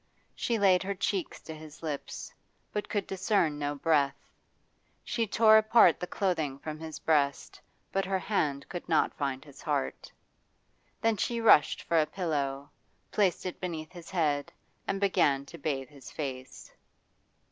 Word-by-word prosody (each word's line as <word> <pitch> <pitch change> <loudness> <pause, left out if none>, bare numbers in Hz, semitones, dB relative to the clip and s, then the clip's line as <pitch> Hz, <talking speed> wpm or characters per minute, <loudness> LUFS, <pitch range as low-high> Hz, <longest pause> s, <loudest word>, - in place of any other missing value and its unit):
She 235 - -1
laid 190 -3 +4
her 200 +1 -3
cheeks 190 -1 -2
to 160 - -8
his 155 0 -12
lips, 150 -3 -5 0.4
but 210 - -3
could 205 -2 -1
discern 190 -6 +1
no 145 0 -2
breath; 140 -2 +2 0.9
she 230 -2 -1
tore 220 +1 +6
apart 220 -6 +5
the 180 - -4
clothing 160 -10 -1
from 155 +2 -6
his 160 -1 -7
breast, 145 -3 0 0.3
but 195 0 0
her 190 0 0
hand 150 -9 -1
could 175 - -7
not 160 - +3
find 135 -1 -3
his 140 -2 -14
heart. 65 - -2 0.9
Then 225 -1 +2
she 235 +4 -1
rushed 215 -10 +5
for 165 -1 +3
a 155 - 0
pillow, 145 -6 -2 0.4
placed 195 -4 +1
it 180 - -5
beneath 165 -3 -4
his 175 -2 -11
head, 150 -6 0 0.4
and 195 - -1
began 145 -8 +2
to - - -11
bathe 135 -3 -2
his 140 0 -12
face. 135 -3 -7
160 Hz, 155 wpm, -30 LUFS, 145-195 Hz, 0.9 s, tore